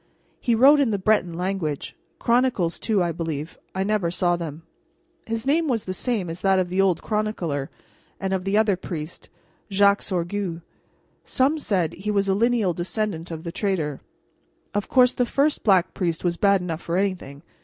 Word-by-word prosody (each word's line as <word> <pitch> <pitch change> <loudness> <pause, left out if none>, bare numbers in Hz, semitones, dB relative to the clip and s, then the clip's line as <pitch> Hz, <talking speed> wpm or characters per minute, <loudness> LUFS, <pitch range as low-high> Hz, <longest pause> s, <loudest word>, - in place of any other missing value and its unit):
He 235 - +1
wrote 275 +6 +7
in 275 -4 +3
the 205 - 0
Breton 190 -2 +2
language. 175 -4 -3 0.2
Chronicles, 235 -8 +1
too, 210 -5 +1
I 170 - 0
believe. 160 -2 -5 0.2
I 190 - 0
never 205 -4 0
saw 175 0 +1
them. 165 -2 -6 0.6
His 225 +1 -3
name 315 +4 +2
was 235 -6 0
the 185 - -3
same 215 -3 -1
as 165 +2 -6
that 195 -1 +3
of 185 -1 0
the 185 +2 +2
old 185 -4 +1
chronicler, 185 -10 -2 0.5
and 190 0 -2
of 190 -1 -1
the 195 +2 +1
other 215 -3 +3
priest, 170 -3 -7 0.4
Jacques 200 0 +4
Sorgue. 175 -1 -3 0.6
Some 280 +5 +1
said 185 - 0
he 200 +3 -5
was 200 -1 +1
a 195 - +3
lineal 225 -3 +2
descendant 175 0 -3
of 165 -1 -6
the 170 - -5
traitor. 170 -7 -2 0.7
Of 205 0 -2
course 250 -1 +5
the 250 - +1
first 280 +5 +1
Black 190 -4 +3
Priest 170 -4 -2
was 175 -1 +1
bad 200 0 +3
enough 170 -2 -4
for 170 +1 -2
anything. 180 -7 -2
190 Hz, 180 wpm, -24 LUFS, 170-215 Hz, 0.7 s, wrote